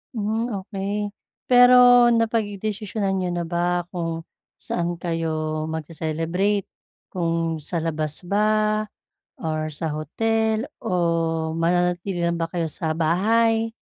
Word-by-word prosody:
Hmm, 220 +2 -1 0.2
okey 205 +1 -3 0.4
pero 245 -1 +7
napagdesisyonan 215 -3 -1
niyo 180 -1 -1
na 175 -1 -2
ba 175 +1 0
kung 165 -2 -3 0.4
saan 175 0 -2
kayo 155 -2 -2
magce-celebrate, 165 +5 -1 0.4
kung 165 -2 -1
sa 170 +2 -2
labas 155 -2 -3
ba 215 +1 +2 0.6
or 155 -1 -2
sa 155 +1 -4
hotel, 220 - 0 0.2
o 165 -5 0
mananatili 175 +1 0
lang 170 0 +1
ba 165 - -1
kayo 170 -1 -2
sa 160 +1 -2
bahay? 225 +7 +2
175 Hz, 110 wpm, -23 LUFS, 165-215 Hz, 0.6 s, pero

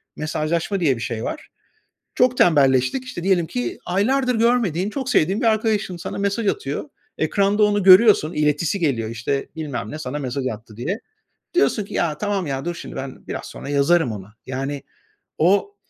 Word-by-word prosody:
"mesajlaşma" 155 +5 -1
diye 150 -7 +2
bir - - -8
şey 115 -1 -3
var. 310 - -5 0.7
Çok 250 0 +3
tembelleştik. 135 - +3
İşte, 255 -9 -7
diyelim 185 -3 +2
ki, 245 +8 -4
aylardır 250 +8 +1
görmediğin, 220 -6 +1
çok 265 +2 -4
sevdiğin 190 +7 +2
bir 245 - +1
arkadaşın 215 -4 +1
sana 170 - -6
mesaj 200 +3 -1
atıyor. 415 - -3 0.3
Ekranda 200 +1 +2
onu 205 -1 +2
görüyorsun, 185 -3 +7
iletisi 150 +3 +1
geliyor, 130 - 0
işte, 120 +4 -2
"Bilmem 145 -8 -4
ne 155 - -6
sana 145 -1 -4
mesaj 130 -1 -3
attı" 110 -2 -6
diye. 180 - -3 0.5
Diyorsun 295 - +2
ki - - -11
"Ya, 155 -3 0
tamam, 200 -3 -1
ya, 135 0 -3
dur 175 0 -2
şimdi, - - -9
ben 135 -1 -7
biraz - - -5
sonra - - -8
yazarım 145 0 +3
ona." 105 0 -9
Yani 135 +2 -4 0.5
o 200 +4 +2
170 Hz, 170 wpm, -22 LUFS, 140-205 Hz, 0.7 s, görüyorsun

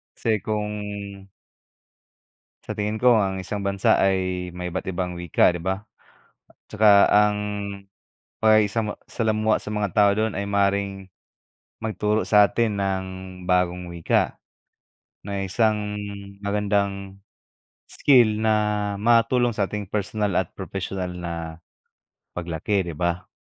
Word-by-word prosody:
Kasi 110 -3 0
kung 105 0 -2 1.9
Sa - - -6
tingin 105 +1 -2
ko 125 -2 +6
ang 95 -2 0
isang 100 +1 -4
bansa 100 0 +2
ay 95 -2 0
may 90 0 -5
iba't 95 +2 -4
ibang 90 -1 -3
wika 85 0 +3
'di 85 -1 -1
ba? 95 +1 -1 0.9
Tsaka 105 -2 +5
ang 105 0 +4 1.0
pakikisama 110 0 +3
salamuha 110 -1 0
sa - - -8
mga 105 -2 -1
tao 100 -1 +5
dun 110 -1 0
ay 100 0 -3
maaaring 100 -1 0 0.7
magturo 110 -1 -1
sa 105 -1 +6
atin 115 -3 0
ng 95 -1 -1 0.4
bagong 90 -1 +1
wika. 85 - +1 0.9
Na 100 -1 -2
isang 105 +1 0 0.4
magandang 100 -1 -1 0.7
skill 120 -6 +4
na 110 0 +2 0.5
matulong 120 +1 +3
sa 100 - +2
ating 105 -1 -5
personal 105 -2 -1
at 95 - 0
professional 95 -2 -5
na 85 -1 -5 1.0
paglaki 90 +4 -1
'di 85 -4 -7
ba? 85 +1 -1
100 Hz, 120 wpm, -24 LUFS, 95-105 Hz, 1.9 s, ko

